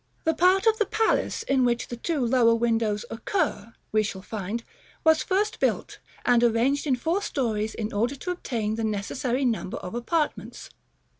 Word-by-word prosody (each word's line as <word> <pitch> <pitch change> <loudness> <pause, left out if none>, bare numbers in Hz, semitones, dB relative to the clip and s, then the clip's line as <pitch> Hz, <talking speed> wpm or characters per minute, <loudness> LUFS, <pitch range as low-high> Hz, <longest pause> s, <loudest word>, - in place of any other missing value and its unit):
The 320 - +2
part 370 +5 +4
of 445 0 +4
the 430 - +2
palace 445 0 +1
in 270 -1 +2
which 240 -1 0
the 240 - -4
two 275 +2 -1
lower 235 -1 +4
windows 225 -2 0
occur, 230 - -2 0.2
we 215 - +3
shall 195 -2 -4
find, 215 +2 -4 0.4
was 320 -1 +5
first 405 +3 0
built, - - -1 0.3
and 240 -1 +4
arranged 240 +6 +2
in 265 - +3
four 330 +10 -1
stories 220 - -1
in 215 0 -4
order 235 +7 0
to 360 +7 -4
obtain 225 -11 -2
the 225 - -2
necessary 240 +5 -1
number 225 -6 -1
of 180 - -7
apartments. 295 +6 -2
240 Hz, 170 wpm, -26 LUFS, 220-315 Hz, 0.4 s, was